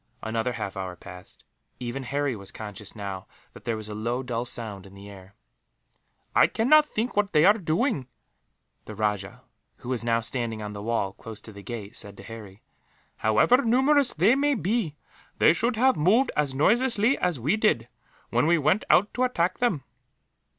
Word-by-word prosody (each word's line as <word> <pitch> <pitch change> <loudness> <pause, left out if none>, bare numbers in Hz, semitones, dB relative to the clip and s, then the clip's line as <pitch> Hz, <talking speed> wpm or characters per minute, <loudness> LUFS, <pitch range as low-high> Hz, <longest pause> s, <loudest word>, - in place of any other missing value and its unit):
Another 115 +2 -1
half 100 - -5
hour 95 -2 -5
passed. 90 0 -13 0.4
Even 125 +2 -4
Harry 140 0 -1
was 100 -2 -9
conscious, 105 -1 -7
now, 100 -3 -6 0.3
that 105 - -14
there 115 -2 -1
was 110 -1 -7
a 105 - -6
low 120 +4 -2
dull 120 -1 -3
sound 105 -6 -5
in 95 - -16
the 100 +1 -11
air. 100 -1 -13 1.0
"I - - +6
cannot 300 +7 +4
think 235 -2 -3
what 205 -2 +1
they 155 +1 +5
are 205 - +8
doing," 165 - 0 0.8
the 110 - -8
rajah, 105 -2 -2 0.3
who 120 - -10
was 125 -3 -1
now 115 -1 +2
standing 115 -1 -2
on 105 -1 -6
the 100 - -7
wall, 105 -3 -1
close 110 0 -8
to 110 - -11
the 100 - -10
gate, 110 0 -7
said 100 -3 -5
to - - -11
Harry. 105 -2 -11 0.5
"However 175 - +3
numerous 265 +3 +3
they 190 +9 +4
may 285 +1 +2
be, 200 - -1 0.4
they - - +5
should 230 +8 0
have 255 +3 +3
moved 210 - +3
as 145 -3 0
noiselessly 235 - +3
as 175 -7 0
we 145 - +1
did, 215 - +1 0.4
when 120 +5 +2
we 170 +1 +4
went 165 +7 +2
out 205 +3 +4
to 250 - 0
attack 185 -8 0
them." 210 - 0
125 Hz, 185 wpm, -26 LUFS, -, 1.0 s, are